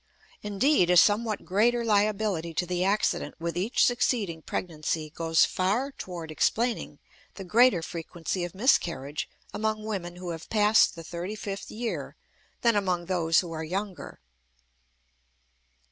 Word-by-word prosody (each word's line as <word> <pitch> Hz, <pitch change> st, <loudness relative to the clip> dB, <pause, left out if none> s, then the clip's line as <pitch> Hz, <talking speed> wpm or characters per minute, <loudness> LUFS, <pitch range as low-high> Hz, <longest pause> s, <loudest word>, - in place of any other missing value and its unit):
Indeed, 210 Hz, -, +2 dB
a 180 Hz, -, +5 dB
somewhat 215 Hz, +3 st, +3 dB
greater 235 Hz, +5 st, +2 dB
liability 205 Hz, -6 st, +1 dB
to 180 Hz, -, 0 dB
the 180 Hz, 0 st, -1 dB
accident 200 Hz, +3 st, 0 dB
with 170 Hz, 0 st, -3 dB
each 195 Hz, +7 st, +2 dB
succeeding 215 Hz, -9 st, 0 dB
pregnancy 155 Hz, -2 st, -3 dB
goes 165 Hz, 0 st, +3 dB
far 215 Hz, +10 st, 0 dB
toward 175 Hz, -9 st, -7 dB
explaining 230 Hz, +9 st, 0 dB, 0.4 s
the 195 Hz, -, -7 dB
greater 210 Hz, -2 st, +4 dB
frequency 170 Hz, +2 st, -4 dB
of 175 Hz, +1 st, -6 dB
miscarriage 170 Hz, -, +1 dB, 0.2 s
among 215 Hz, 0 st, -1 dB
women 190 Hz, -5 st, -4 dB
who 180 Hz, -1 st, -6 dB
have 165 Hz, -1 st, -8 dB
passed 210 Hz, -1 st, +4 dB
the 165 Hz, -, -9 dB
thirty 175 Hz, +5 st, -5 dB
fifth 200 Hz, -1 st, -6 dB
year 230 Hz, +1 st, -4 dB, 0.5 s
than 235 Hz, -2 st, +3 dB
among 180 Hz, -4 st, 0 dB
those 165 Hz, -3 st, +2 dB
who 175 Hz, -3 st, -8 dB
are 160 Hz, -1 st, -4 dB
younger. 190 Hz, +4 st, -5 dB
185 Hz, 135 wpm, -27 LUFS, 170-215 Hz, 0.5 s, a